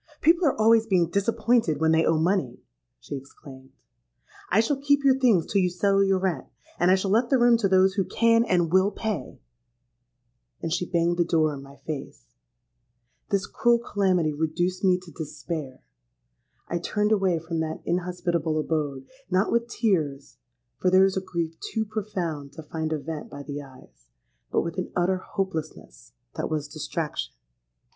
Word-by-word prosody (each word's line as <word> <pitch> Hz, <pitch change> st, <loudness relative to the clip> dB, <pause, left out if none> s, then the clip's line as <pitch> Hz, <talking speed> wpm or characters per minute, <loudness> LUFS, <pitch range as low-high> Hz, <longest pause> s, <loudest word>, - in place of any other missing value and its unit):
'—'People 335 Hz, +1 st, +4 dB
are 270 Hz, -, 0 dB
always 225 Hz, 0 st, +5 dB
being 180 Hz, -5 st, +3 dB
disappointed 205 Hz, -, +1 dB
when 160 Hz, 0 st, +3 dB
they 160 Hz, 0 st, +4 dB
owe 165 Hz, -, +2 dB
money,' 160 Hz, -7 st, 0 dB, 0.4 s
she -, -, -9 dB
exclaimed. 135 Hz, -1 st, -12 dB, 0.8 s
'I 195 Hz, -, +3 dB
shall 270 Hz, +5 st, +1 dB
keep 285 Hz, 0 st, +3 dB
your 265 Hz, -1 st, +4 dB
things 225 Hz, -11 st, +4 dB
till 200 Hz, -, +1 dB
you 180 Hz, -, +2 dB
settle 195 Hz, +2 st, +2 dB
your 195 Hz, -1 st, +2 dB
rent; 185 Hz, -2 st, -2 dB, 0.3 s
and 175 Hz, -, +3 dB
I 185 Hz, -, +6 dB
shall 190 Hz, 0 st, -1 dB
let 235 Hz, +3 st, +3 dB
the 270 Hz, -, +4 dB
room 240 Hz, -1 st, +5 dB
to 220 Hz, -4 st, +1 dB
those 190 Hz, 0 st, +4 dB
who 195 Hz, -1 st, +1 dB
can 230 Hz, +5 st, +3 dB
and 175 Hz, -6 st, +1 dB
will 190 Hz, +1 st, +5 dB
pay.' 215 Hz, 0 st, -4 dB, 1.2 s
And 165 Hz, -1 st, -3 dB
she 180 Hz, 0 st, -2 dB
banged 175 Hz, -1 st, +1 dB
the 175 Hz, -, +4 dB
door 160 Hz, -3 st, +1 dB
in 140 Hz, -, -7 dB
my 140 Hz, 0 st, -13 dB
face. 65 Hz, -, -7 dB, 1.0 s
This 200 Hz, -1 st, 0 dB
cruel 240 Hz, 0 st, +2 dB
calamity 190 Hz, -8 st, 0 dB
reduced 175 Hz, +5 st, -1 dB
me 185 Hz, -1 st, +4 dB
to 180 Hz, -2 st, -13 dB
despair. 155 Hz, -4 st, -6 dB, 0.8 s
I 175 Hz, -, -2 dB
turned 210 Hz, +4 st, 0 dB
away 195 Hz, -5 st, +2 dB
from 165 Hz, +1 st, -4 dB
that 160 Hz, 0 st, -4 dB
inhospitable 175 Hz, -3 st, -1 dB
abode,—not 160 Hz, -, -2 dB
with 235 Hz, 0 st, +1 dB
tears, 155 Hz, -, -1 dB, 0.4 s
for 185 Hz, -, +2 dB
there 185 Hz, +1 st, +6 dB
is 195 Hz, -, 0 dB
a 190 Hz, -, 0 dB
grief 170 Hz, -3 st, -4 dB
too 220 Hz, -1 st, -3 dB
profound 180 Hz, -9 st, -4 dB
to 160 Hz, -, -9 dB
find 160 Hz, +1 st, -4 dB
a 155 Hz, -, 0 dB
vent 150 Hz, +1 st, -6 dB
by 140 Hz, 0 st, -8 dB
the 145 Hz, 0 st, -6 dB
eyes—but -, -, -8 dB
with 170 Hz, +2 st, -4 dB
an 180 Hz, -, -4 dB
utter 180 Hz, +1 st, +2 dB
hopelessness 165 Hz, -, -6 dB, 0.2 s
that -, -, -2 dB
was 155 Hz, -2 st, -2 dB
distraction! 150 Hz, -, -4 dB
175 Hz, 170 wpm, -25 LUFS, 155-200 Hz, 1.2 s, I